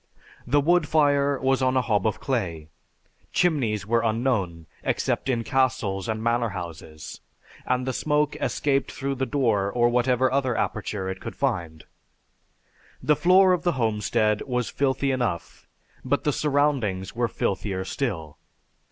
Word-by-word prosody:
The 145 - +3
wood 170 +1 +3
fire 145 -2 +2
was 135 0 +1
on 130 0 +2
a - - +4
hob 105 -3 +1
of 110 - -2
clay. 90 - -3 0.6
Chimneys 120 - +1
were 115 +2 +2
unknown, 110 -8 -1 0.2
except - - -1
in 120 -3 0
castles 115 -8 0
and 110 0 -2
manor 115 0 +1
houses, 85 -5 -8 0.5
and 125 0 0
the 130 - -2
smoke 150 +2 0
escaped 140 -2 0
through 140 0 -3
the 130 0 -2
door 115 -8 +1
or 120 +1 +3
whatever 125 +1 +2
other 130 -3 0
aperture 100 -2 -2
it 95 - -5
could - - -7
reach. 80 -2 -2 1.2
The 150 +3 +4
floor 185 +3 +5
of 180 - 0
the 175 - +1
homestead 105 -3 +1
was 125 -2 -1
filthy 135 0 0
enough, 120 -10 -3 0.4
but - - 0
the 150 - +1
surroundings 135 -12 0
were 120 0 +1
filthier 95 -3 -2
still. 80 - -4
120 Hz, 145 wpm, -25 LUFS, 100-140 Hz, 1.2 s, floor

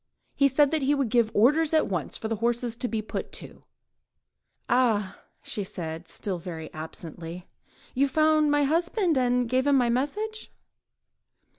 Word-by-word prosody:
He 280 - +4
said 275 +1 +3
that 315 -1 +1
he 280 +2 +2
would 275 -5 0
give 235 -1 +3
orders 295 +8 +4
at 310 - +4
once 180 -6 -3
for 220 - -4
the 225 0 -2
horses 235 +1 -1
to 245 - -3
be 220 -2 -2
put - - -5
to." - - -6 1.1
"Ah!" 225 -6 +1 0.2
she 205 - -3
said, 165 -2 -6
still 190 -4 -4
very 165 -2 -7
absently, 165 +2 -8 0.5
"you 275 +2 +2
found 310 +1 +3
my 290 0 +3
husband, 340 +4 +1
and 250 -1 +2
gave 255 +3 +1
him 285 - +4
my 245 -2 +2
message?" 420 - -2
245 Hz, 160 wpm, -26 LUFS, 205-290 Hz, 1.1 s, He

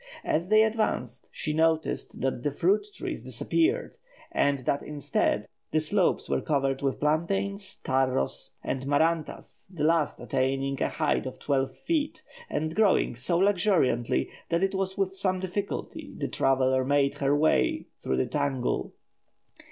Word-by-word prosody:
As 170 +4 0
they 215 0 +6
advanced, 215 - -1
she 155 - -2
noticed 160 0 0
that 130 -2 -1
the 145 - 0
fruit 185 - +1
trees - - -5
disappeared, 390 +10 0 0.3
and 140 0 +2
that 140 - +1
instead 150 -2 -1 0.2
the 155 - +2
slopes 175 +4 +1
were - - 0
covered 135 -3 0
with 135 -1 -1
plantains, 195 +6 0
tarros, 130 - 0
and 135 0 -3
marantas, 160 +2 0
the 165 -5 -4
last 160 -1 +2
attaining 135 +1 -1
a - - +2
height - - 0
of - - -7
twelve 135 -2 0
feet, 310 - -1 0.3
and 155 +2 -2
growing 205 - +3
so 125 +8 0
luxuriantly 180 - +2 0.2
that 170 +2 +1
it 195 - +1
was 190 0 -2
with 190 -1 0
some 185 -1 0
difficulty 185 +2 -4
the - - -2
traveller 130 -1 +2
made 140 +1 +2
her 140 +1 +2
way 155 +1 +2 0.2
through 65 - -1
the 65 - +2
tangle. 140 -4 -1
155 Hz, 145 wpm, -28 LUFS, 135-190 Hz, 0.3 s, they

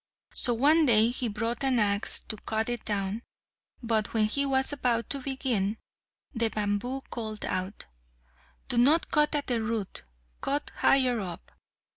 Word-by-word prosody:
So 240 - 0
one 300 +6 +4
day 225 -1 +6
he 245 0 -2
brought 230 +4 -2
an 265 -2 +2
axe 205 -1 +1
to 220 - -5
cut 220 +2 -2
it 240 -2 -3
down; 200 +1 -2 0.6
but 225 -1 0
when 220 -1 +4
he 280 +6 +1
was 265 +1 +2
about 240 -4 0
to 280 - 0
begin, 250 -6 -1 0.6
the 230 -2 +1
bamboo 215 +6 -2
called 215 -3 -4
out, 185 +2 -3 0.8
"Do 240 - +1
not 295 +7 +4
cut 300 0 +3
at 290 - -1
the 240 -3 0
root, 220 -3 -3 0.4
cut 290 +1 -1
higher 255 -3 +3
up." 180 -4 -7
230 Hz, 155 wpm, -28 LUFS, 215-265 Hz, 0.8 s, day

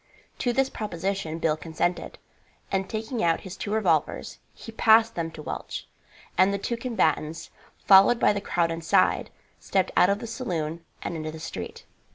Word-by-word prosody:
To 245 - +1
this 270 +2 +2
proposition 195 -6 -3
Bill 160 -2 +1
consented, 165 +2 -2 0.5
and 190 0 -1
taking 225 +2 -3
out 165 -1 +2
his 190 -1 -8
two 205 - -5
revolvers 220 0 0
he 225 - -11
passed 225 0 +5
them 165 -1 -3
to 155 -1 -10
Welch, - - -6 0.5
and 190 +1 +6
the 200 - 0
two 235 +4 -2
combatants, 175 - -1 0.3
followed 200 +5 +7
by - - +4
the 200 - -3
crowd 170 -4 0
inside, 165 0 +2 0.3
stepped 190 -2 0
out 180 - +5
of 200 - +2
the 225 - -7
saloon 170 - -3 0.2
and - - -3
into 155 -1 -4
the 160 - -9
street. 95 - -7
190 Hz, 170 wpm, -26 LUFS, 165-220 Hz, 0.5 s, followed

